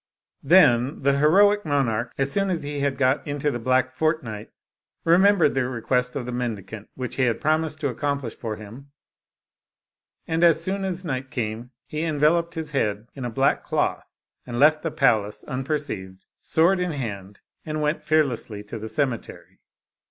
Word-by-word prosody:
Then 135 -5 +4
the 140 0 +3
heroic 205 +7 +5
monarch, 125 -6 0
as 135 0 +1
soon 195 +2 +1
as 170 -4 -2
he 145 0 -4
had 140 -1 0
got 135 +3 +1
into 145 0 -1
the 120 - -4
black 130 +2 +1
fortnight, 130 -10 -2 0.5
remembered 175 -2 +4
the 130 -2 0
request 125 +1 -1
of 135 -4 -3
the 125 - -5
mendicant, 110 -4 -5
which 125 -3 -5
he 130 - +3
had 115 -2 0
promised 155 0 0
to 145 - +1
accomplish 140 -1 -2
for 110 -3 -5
him, 115 +7 -12 1.3
and 165 +1 0
as 165 -2 +6
soon 190 +4 -2
as 185 -1 -3
night 130 -3 -3
came, 115 0 -4 0.2
he 155 - -4
enveloped 165 +2 +1
his 160 -2 -5
head 110 -4 -1
in 135 -3 -6
a - - -2
black 135 +4 +1
cloth, - - -1 0.4
and 120 -1 -6
left 155 +3 +5
the 165 - -2
palace 110 -9 +1
unperceived, 130 -9 -4
sword 175 +4 +2
in 180 -2 -1
hand, 100 -7 -6 0.2
and 155 0 -3
went 150 +2 0
fear 155 0 +4
lessly 110 -6 -6
to 115 - -5
the 110 +1 -6
cemetery. 125 +1 -3
140 Hz, 170 wpm, -24 LUFS, 120-155 Hz, 1.3 s, as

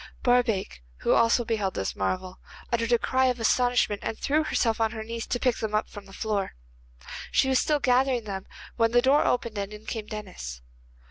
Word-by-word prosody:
Barbaik, 235 - +1 0.2
who - - +3
also 230 +1 +3
beheld 210 -4 -1
this 95 - -2
marvel, 185 - -3 0.3
uttered 230 0 +1
a 240 - +6
cry 260 +2 +1
of 250 -1 0
astonishment, 245 -3 +2
and 225 - -3
threw 305 +2 +1
herself 230 -6 0
on 225 0 +1
her 220 -1 -5
knees 230 +1 -5
to 245 - -1
pick 250 -2 +1
them 215 -1 -2
up 215 - +1
from 205 -2 -10
the - - -14
floor. 205 -1 -2 0.8
She 265 - +3
was 260 - +4
still 300 -1 +1
gathering 255 -1 +2
them 195 -2 -6 0.3
when 230 -1 +2
the 245 - +6
door 275 +3 +5
opened 235 -4 0
and 200 0 -4
in 210 +1 -10
came 220 -2 -5
Denis. 180 - -7
225 Hz, 200 wpm, -27 LUFS, 205-245 Hz, 0.8 s, a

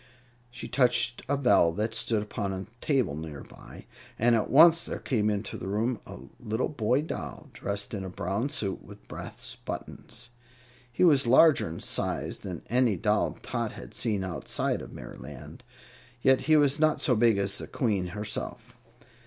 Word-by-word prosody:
She 120 0 -7
touched 125 -1 +2
a 140 - +2
bell 125 -11 +4
that 110 +4 -2
stood 110 -1 0
upon 105 -2 -3
a 95 0 -5 0.2
table 130 - +1
near 75 -2 -7
by, - - -13 0.3
and 120 +2 +3
at 110 -2 +1
once 165 +3 +7
there - - -4
came 110 -5 0
into 105 0 -3
the 95 - -6
room 110 +4 0
a - - -8 0.2
little 110 +1 -2
boy 125 0 +1
doll, 160 - -7
dressed 100 +1 -4
in 100 -3 -3
a 95 - -5
brown 100 +8 -2
suit 105 -10 -3
with - - -14
brass - - -8
buttons. 120 - -7 0.6
He 120 - 0
was 145 -7 +5
larger 140 - +6
in 80 - -7
size - - -2
than 90 -4 -7
any 120 -4 +2
doll - - +1
Tot - - -3
had - - -10
seen 105 -5 -1
outside 90 -2 -2
of - - -10
Merryland, - - -10 0.6
yet 130 -1 +5
he 155 - +7
was 145 0 +3
not 155 -1 +3
so 130 -6 +3
big 115 -1 +4
as 100 0 0
the - - -7
Queen 100 -7 0
herself. 105 +4 -4
110 Hz, 170 wpm, -28 LUFS, 100-130 Hz, 0.6 s, once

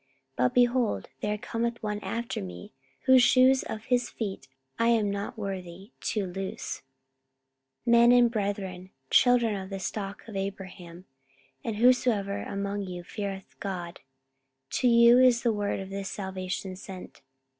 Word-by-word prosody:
But, 125 0 +1
behold, 240 - +2
there 210 +6 -1
cometh 235 +2 -3
one 210 -1 -2
after 230 +2 -4
me, 90 -2 -9 0.3
whose 260 -1 +6
shoes 255 +1 +5
of 220 0 -6
his 245 0 +1
feet 195 - -5 0.3
I 230 - +3
am 220 -4 +3
not 200 +4 -4
worthy 195 0 -6
to 210 -3 0
loose. 190 +1 -5 1.0
44:013:026 235 - +2
Men 235 0 +7
and 245 -1 +5
brethren, 195 -4 -3 0.2
children 240 -3 +4
of 190 -1 -6
the 195 - -4
stock 195 +2 -5
of 220 - -9
Abraham, 190 -2 -6 0.6
and 225 - -3
whosoever 225 -4 +2
among 200 +1 -3
you 180 -2 -6
feareth 195 +1 -6
God, 180 -4 -5 0.7
to 255 - +1
you 235 +1 +7
is 250 -2 +5
the 235 -2 +2
word 205 -1 -1
of 195 0 -7
this 195 0 -4
salvation 190 -1 -4
sent. 190 -1 -10
205 Hz, 145 wpm, -28 LUFS, 190-235 Hz, 1.0 s, Men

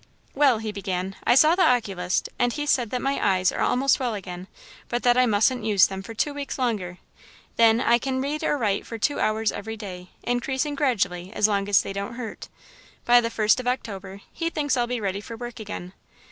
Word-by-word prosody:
"Well," 275 -4 +4
he 215 -1 -4
began, 190 -2 -4
"I 240 - +5
saw 305 +5 +6
the 375 - +1
oculist, 195 - +1
and 245 0 +2
he 295 +3 -3
says 255 -5 +2
that 250 +1 -3
my 275 +1 -1
eyes 185 -2 +3
are - - -4
almost 265 +1 +2
well 245 -4 -1
again, 180 -2 -7 0.4
but 240 0 -2
that 245 -1 +4
I 250 0 +4
mustn't 220 +4 +2
use 205 -3 +5
them 190 0 -5
for 225 +4 -9
two 290 +6 0
weeks 285 -1 -5
longer. 210 -9 -2 0.6
Then, 230 0 +5
I 235 -1 +3
can 260 +1 -2
read 285 +3 -2
or 295 - +1
write 210 -6 -1
for 230 - -6
two 285 +7 0
hours 215 0 +1
every 220 +2 -6
day, 180 -4 -8
increasing 265 +4 -1
gradually 190 - -1
as 215 - +3
long 200 -1 -1
as 200 - +5
they - - -5
don't 200 +4 -5
hurt. 230 -3 -7 0.6
By 240 0 +6
the 230 - -2
first 220 +1 +2
of 250 - -5
October, 200 -6 -4
he 330 0 -2
thinks 290 -4 0
I'll 240 -1 0
be 245 0 -2
ready 200 -1 -2
for 230 +2 -9
work 240 0 -7
again. 200 -4 -7
230 Hz, 215 wpm, -24 LUFS, 200-255 Hz, 0.6 s, saw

